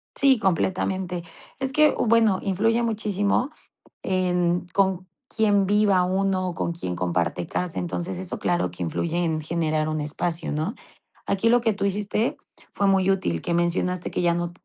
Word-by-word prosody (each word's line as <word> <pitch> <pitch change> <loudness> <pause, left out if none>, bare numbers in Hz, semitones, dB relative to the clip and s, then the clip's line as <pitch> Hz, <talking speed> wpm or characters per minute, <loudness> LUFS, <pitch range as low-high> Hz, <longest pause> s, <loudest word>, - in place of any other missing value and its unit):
Sí, 270 -2 +4
completamente. 185 -2 -1 0.4
Es 265 0 -1
que, 305 0 +5
bueno, 225 -4 +3
influye 225 +5 +1
muchísimo 210 +2 0 0.5
en 180 -1 0
con 190 -2 +1 0.3
quién 205 -3 +3
viva 200 -2 +3
uno, 185 0 0
con 170 0 -2
quién 90 - -4
comparte 85 -1 -1
casa, 180 -2 -2
entonces, 175 +1 -3
eso 185 -1 -4
claro 175 - 0
que 90 +1 -6
influye 165 - -2
en 160 -2 -1
generar 155 -1 -1
un 155 -1 -2
espacio, 165 +3 -2
¿no?, 155 - -2 0.5
aquí 200 +3 +1
lo 240 +1 +4
que 230 -1 +2
tú 200 0 -2
hiciste, 205 +3 0 0.4
fue 200 - 0
muy 195 -1 +3
útil, 85 - 0
que - - -2
mencionaste 175 +1 0
que - - -1
ya 170 -1 +3
no 175 0 -2
185 Hz, 160 wpm, -24 LUFS, 170-205 Hz, 0.5 s, que